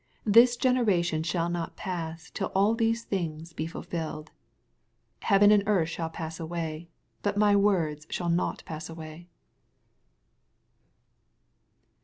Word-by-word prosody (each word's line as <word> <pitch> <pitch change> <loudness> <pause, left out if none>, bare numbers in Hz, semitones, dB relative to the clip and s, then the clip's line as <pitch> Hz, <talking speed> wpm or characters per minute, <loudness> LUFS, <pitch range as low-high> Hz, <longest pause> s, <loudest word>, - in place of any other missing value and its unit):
This 235 +3 +6
gen 255 +1 +2
eration 175 -9 +1
shall 170 0 0
not 175 -1 -3
pass 165 -3 -5
till 195 - -3
all 200 +3 +4
these 230 0 0
things 165 -5 -4
be 160 - -3
fulfilled. 160 -2 -6 0.9
85 - - -6
Heaven 205 0 +6
and 205 -1 +5
earth 180 -6 +2
shall 165 0 -3
pass 160 0 -6
away, 165 0 -5 0.3
but 205 0 -1
my 205 -1 +4
words 165 -7 +1
shall 175 -1 -1
not 170 +2 -1
pass 155 +1 -6
away. 165 +1 -10
170 Hz, 130 wpm, -28 LUFS, 160-205 Hz, 0.9 s, This